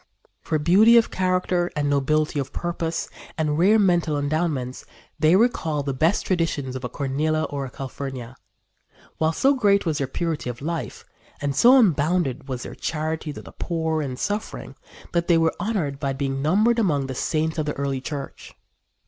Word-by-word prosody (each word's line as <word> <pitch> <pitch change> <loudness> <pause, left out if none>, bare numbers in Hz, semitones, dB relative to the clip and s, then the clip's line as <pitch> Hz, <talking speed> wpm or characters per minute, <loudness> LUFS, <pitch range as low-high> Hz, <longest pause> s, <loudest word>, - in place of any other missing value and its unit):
For 155 - -1
beauty 195 +10 +6
of 230 - +3
character 180 -1 0
and 145 -2 0
nobility 145 +2 +1
of 135 -1 -4
purpose 170 -1 -3 0.3
and 155 -1 0
rare 200 +5 +5
mental 175 -7 +2
endowments 145 -3 -2 0.4
they 155 +3 +5
recall 165 -9 +1
the 140 -1 -2
best 160 +9 +1
traditions 160 -7 -1
of 130 - -6
a 125 - -3
Cornelia 150 +4 -1
or 140 -2 -3
a - - -7
Calphurnia, 130 -2 -7 0.8
while 160 0 +2
so 270 - +3
great 205 -7 +3
was 160 -3 0
their 135 - -1
purity 160 -1 -3
of 120 0 -6
life 165 +3 -5 0.3
and 140 -1 -2
so 245 - +7
unbounded 160 - +2
was 125 -2 -4
their - - -7
charity 155 0 -3
to - - -9
the - - -12
poor 160 -2 -2
and 130 -3 -4
suffering 205 +7 -4 0.4
that 170 0 0
they 170 - +5
were 165 0 +2
honored 170 -11 -2
by 140 -2 -1
being 135 0 -2
numbered 215 +10 +3
among 150 -10 +1
the 135 - -5
saints 160 +4 -1
of 150 - -1
the 150 - -1
early 135 -1 -2
church. 140 0 -7
155 Hz, 175 wpm, -23 LUFS, 140-175 Hz, 0.8 s, so